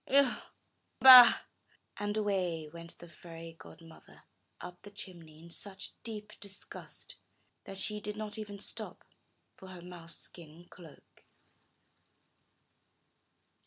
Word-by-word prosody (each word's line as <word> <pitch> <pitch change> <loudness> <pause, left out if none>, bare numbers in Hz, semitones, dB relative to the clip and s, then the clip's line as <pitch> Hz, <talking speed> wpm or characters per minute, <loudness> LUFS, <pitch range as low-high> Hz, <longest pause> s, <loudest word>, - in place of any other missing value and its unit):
Ugh! 275 -2 +4 0.6
Bah!" 255 -2 +11 0.6
And 205 +1 -2
away 185 -7 -1
went 170 +2 -10
the 175 - -12
fairy 165 0 -11
godmother 165 -1 -15 0.4
up 180 0 -9
the 205 - -11
chimney 175 -6 -9
in 170 - -13
such 190 +2 -6
deep 215 -2 -7
disgust 200 -1 -9 0.5
that 195 - -8
she 210 +2 -1
did 210 0 -4
not 215 0 -4
even 205 -2 -6
stop 200 - -4 0.5
for 190 - -12
her 185 -2 -10
mouse 175 -2 -10
skin 170 0 -12
cloak. 165 -4 -16
185 Hz, 115 wpm, -32 LUFS, 170-210 Hz, 0.6 s, Bah